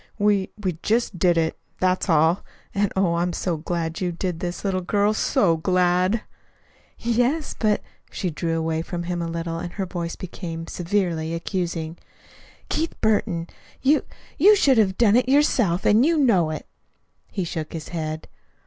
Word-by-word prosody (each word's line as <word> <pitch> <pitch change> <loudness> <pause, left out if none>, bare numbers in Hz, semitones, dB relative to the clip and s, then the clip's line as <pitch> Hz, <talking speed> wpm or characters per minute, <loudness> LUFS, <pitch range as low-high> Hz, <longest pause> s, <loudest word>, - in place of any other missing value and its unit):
We 205 -2 +2
we 185 -6 -3
just 220 -4 0
did 175 0 +3
it. 160 -1 0 0.2
That's 185 +1 +1
all. 160 +2 +3 0.3
And, 200 0 +1
oh, 190 -3 +2
I'm 175 +1 0
so 175 -2 -1
glad 165 +1 -3
you 180 -1 0
did 175 0 -3
this, 175 +2 -4
little 190 -1 0
girl, 205 +3 +2
so 175 -5 +2
glad!" 180 +4 +2 0.7
"Yes, 245 +6 0
but 215 -2 +1
" - - -37
She 180 -4 -2
drew 165 +1 -1
away 160 0 -1
from 175 +1 -4
him 175 0 -2
a 170 - -2
little, 165 0 -3
and 175 0 -6
her 195 - -2
voice 170 -2 -4
became 165 -3 -6
severely 170 -3 -1
accusing. 165 -2 -3 0.7
"Keith 325 +2 -2
Burton, 200 -6 +1 0.4
you 290 +3 +4 0.4
you 410 +7 +8
should 270 - +4
have 190 -3 +2
done 225 -3 +5
it 250 +1 +3
yourself, 240 - +3
and 215 +4 +5
you 325 +3 +3
know 210 - +3
it." 155 - -5 0.7
He 190 - -2
shook 160 -2 -4
his 160 -2 -6
head. 155 -2 -4
180 Hz, 165 wpm, -23 LUFS, 165-210 Hz, 0.7 s, you